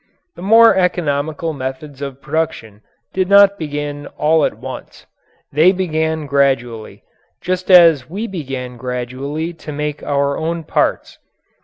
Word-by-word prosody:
The - - -11
more 225 +4 +6
economical 160 -3 -1
methods 135 +1 -7
of 140 -1 -7
production 155 -10 -3 0.3
did 185 0 0
not 200 0 +6
begin 145 -1 -5
all 155 +1 +3
at - - -3
once. - - -9 0.5
They 160 +6 +5
began 160 -4 -1
gradually 130 -5 -1 0.4
just 185 +1 -3
as 165 -8 +6
we 200 +7 -4
began 135 - -6
gradually 130 +6 -4
to 160 -2 -9
make 150 0 -4
our 140 0 -1
own 165 +1 -3
parts. - - -1
150 Hz, 130 wpm, -17 LUFS, 140-170 Hz, 0.5 s, more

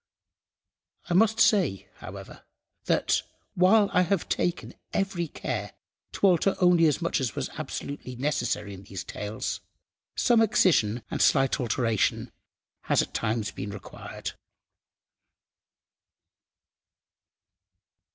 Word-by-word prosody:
I - - +3
must 220 +4 +4
say, 200 - +3
however, - - -10 0.4
that, - - +2 0.3
while 200 +4 +5
I 180 - +5
have 185 0 0
taken 175 0 -2 0.2
every 195 -4 -1
care 105 -8 -4 0.4
to - - 0
alter 190 +1 +4
only 180 -2 +5
as 150 +3 0
much 165 -3 0
as 120 -6 -2
was - - -3
absolutely 140 -3 -6
necessary 125 -6 -2
in 95 - -10
these 95 -1 -7
tales, 105 +1 -4 0.5
some 235 -2 +4
excision 160 - +3
and - - -2
slight 135 -1 +3
alteration 115 -3 0 0.5
has - - +3
at - - -10
times 110 -2 -1
been 100 - -6
required. 100 - -7
150 Hz, 110 wpm, -27 LUFS, -, 0.5 s, while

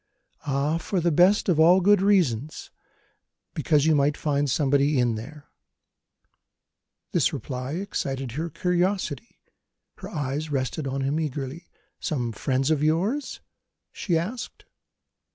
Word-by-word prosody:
"Ah, 145 +4 0
for 185 +3 -2
the 170 0 +1
best 180 +6 +4
of 170 -5 +2
all 175 +4 +6
good 200 +1 +4
reasons! 155 - +1 0.8
Because 150 -1 +2
you 160 - +4
might 145 0 +2
find 145 -1 0
somebody 140 +1 +2
in 120 -2 +2
there." 140 +7 -8 1.7
This - - +2
reply 130 +1 -5
excited 135 -8 -3
her 160 +7 -3
curiosity: 180 -3 -1 0.6
her - - -8
eyes 145 +2 -3
rested 140 +1 -2
on 135 +1 -2
him 140 +4 0
eagerly. 150 +2 -4 0.3
"Some 125 -6 -2
friend 130 +4 -1
of 150 -2 +1
yours?" 190 - 0 0.5
she 175 -4 -1
asked. 210 +10 -5
150 Hz, 125 wpm, -25 LUFS, 135-175 Hz, 1.7 s, all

